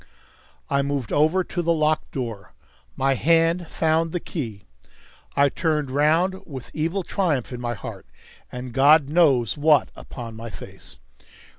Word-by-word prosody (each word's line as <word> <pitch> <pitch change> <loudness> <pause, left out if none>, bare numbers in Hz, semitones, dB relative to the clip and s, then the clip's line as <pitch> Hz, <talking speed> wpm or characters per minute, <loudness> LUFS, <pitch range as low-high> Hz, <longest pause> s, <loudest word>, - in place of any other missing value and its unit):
I 140 0 +1
moved 140 -3 -3
over 160 +6 +3
to 175 - -3
the 170 0 +1
locked 155 -1 +1
door. 115 -7 -6 0.4
My 135 0 +2
hand 165 +4 +2
found 160 +1 0
the 175 - -2
key. 115 - -6 0.7
I 140 0 +5
turned 150 -2 -1
round 165 +7 +2
with 130 -5 -9
evil 165 +5 -1
triumph 155 - -1
in 120 - -6
my 120 -1 -2
heart, - - -9 0.4
and 125 -1 -7
God 140 +1 +5
knows 145 - +3
what 150 -2 +4
upon 115 -2 -9
my 115 +1 -7
face. - - -12
145 Hz, 145 wpm, -23 LUFS, 130-165 Hz, 0.7 s, I